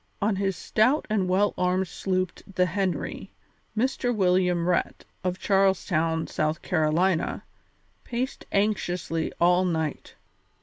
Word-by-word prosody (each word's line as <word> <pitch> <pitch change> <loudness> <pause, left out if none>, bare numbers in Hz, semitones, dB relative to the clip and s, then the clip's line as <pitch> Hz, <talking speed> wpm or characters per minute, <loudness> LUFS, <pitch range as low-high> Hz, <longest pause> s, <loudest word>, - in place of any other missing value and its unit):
On 205 -1 +1
his 195 -1 0
stout 250 - +2
and 195 -4 +1
well 200 +3 +2
armed 180 +1 +1
sloop 185 0 -1 0.2
the 180 - +4
Henry, 185 0 -2 0.5
Mr. 250 +1 +1
William 180 -3 +2
Rhett, 180 -1 0 0.2
of 180 0 -1
Charles 195 -1 +2
Town, 160 -2 0
South 155 +2 -2
Carolina, 165 +2 +1 0.6
paced 250 +2 -4
anxiously 180 -5 0
all 180 +1 +4
night. 160 -4 -2
185 Hz, 120 wpm, -26 LUFS, 175-200 Hz, 0.6 s, the